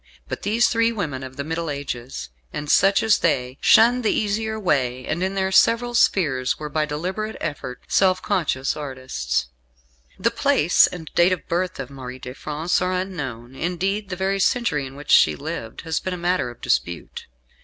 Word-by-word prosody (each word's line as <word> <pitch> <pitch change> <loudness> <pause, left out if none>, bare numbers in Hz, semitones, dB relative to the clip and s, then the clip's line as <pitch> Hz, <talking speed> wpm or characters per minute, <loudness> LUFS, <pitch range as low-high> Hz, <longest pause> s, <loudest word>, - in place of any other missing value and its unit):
But - - -5
these 225 +4 +3
three 230 0 +2
women 160 - -3
of 130 0 -9
the 140 - -2
Middle 165 +2 -3
Ages 135 - -5 0.2
and 145 0 -3
such 195 0 +4
as 220 -2 +4
they 130 -5 0
shunned 235 +5 +5
the 215 - +2
easier 220 +1 -1
way, 130 - 0
and, 170 - -2
in 190 +1 -1
their 190 -1 0
several 230 +5 +4
spheres, 135 - +2
were 150 -1 -6
by 155 0 0
deliberate 185 +9 -3
effort, 140 -5 -5
self 185 -1 +3
conscious 155 -10 -1
artists. 130 - -3 0.7
The - - +1
place 160 +4 +4
and 160 -3 -8
date 175 +2 +4
of 180 - -6
birth 180 0 -1
of 135 0 -6
Marie 130 -2 -8
de 125 0 -8
France 155 +5 -1
are 180 0 0
unknown 135 -11 -4
indeed 190 +7 -2
the 180 - -3
very 190 +2 -1
century 185 - +1
in 130 - -12
which 145 0 -6
she 75 - +6
lived - - -6
has 160 -1 -2
been 185 -1 -3
a - - -7
matter 175 -6 0
of 120 - -13
dispute. 85 -1 -2
165 Hz, 185 wpm, -23 LUFS, 135-195 Hz, 0.7 s, she